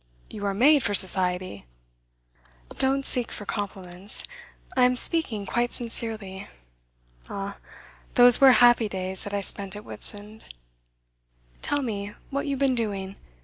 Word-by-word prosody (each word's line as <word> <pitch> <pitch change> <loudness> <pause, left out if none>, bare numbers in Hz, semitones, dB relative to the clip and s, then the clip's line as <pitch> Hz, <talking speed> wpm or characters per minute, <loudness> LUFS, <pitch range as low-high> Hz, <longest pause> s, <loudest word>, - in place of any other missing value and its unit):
You 205 -1 -4
are 200 - -1
made 285 +7 +5
for 205 - 0
Society.' 180 - +1 1.1
'Don't 270 +1 0
seek 245 -2 +3
for 205 - -7
compliments. 190 -2 -4 0.5
I 255 -1 +5
am 250 0 +2
speaking 240 -10 +1
quite 240 +4 -1
sincerely. 220 -5 -3 0.8
Ah, 200 0 -6 0.6
those 245 0 +7
were 265 -2 +8
happy 240 -2 +5
days 190 -1 -5
that 205 - -6
I 200 - -1
spent 195 0 -3
at 210 - -9
Whitsand! 210 +1 -9 1.2
Tell 290 -1 -1
me 205 -3 -4 0.2
what 280 +2 -3
you 280 - -1
have - - -7
been 275 -2 +2
doing. 200 -5 -3
210 Hz, 140 wpm, -25 LUFS, 195-245 Hz, 1.2 s, were